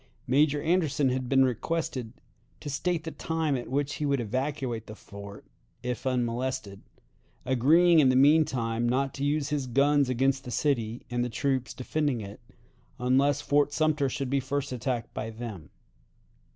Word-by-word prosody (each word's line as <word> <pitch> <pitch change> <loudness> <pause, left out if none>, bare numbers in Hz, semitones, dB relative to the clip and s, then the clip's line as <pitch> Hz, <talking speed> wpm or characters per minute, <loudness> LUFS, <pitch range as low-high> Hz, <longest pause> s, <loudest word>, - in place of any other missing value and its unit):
Major 145 +3 +3
Anderson 155 -5 +2
had 130 -1 -2
been 135 -1 +5
requested 130 -2 -2 0.5
to 145 - -6
state 165 +3 -1
the 160 - -5
time 160 -3 -1
at 125 - -4
which 140 +2 -1
he 150 - -2
would 140 -1 +1
evacuate 125 0 -3
the 110 - -8
fort, 100 0 -11 0.4
if 125 +1 -3
unmolested, 120 -5 -2 0.6
agreeing 160 +7 +5
in 135 -4 +5
the 130 - +3
mean 145 +4 +6
time 115 -3 -1
not 135 +2 0
to 140 - -5
use 145 0 0
his 145 -3 -2
guns 140 +2 +3
against 135 +2 +1
the - - -8
city 120 -4 -1
and 120 0 0
the 125 - -2
troops 130 -1 -1
defending 140 0 -1
it 100 -1 -8 0.6
unless 135 +3 +2
Fort 145 0 +2
Sumter 155 -3 +1
should 135 -1 -3
be 140 - +2
first 140 +1 -3
attacked 125 -1 -3
by 110 - -4
them. 110 -7 -8
135 Hz, 165 wpm, -28 LUFS, 120-145 Hz, 0.6 s, mean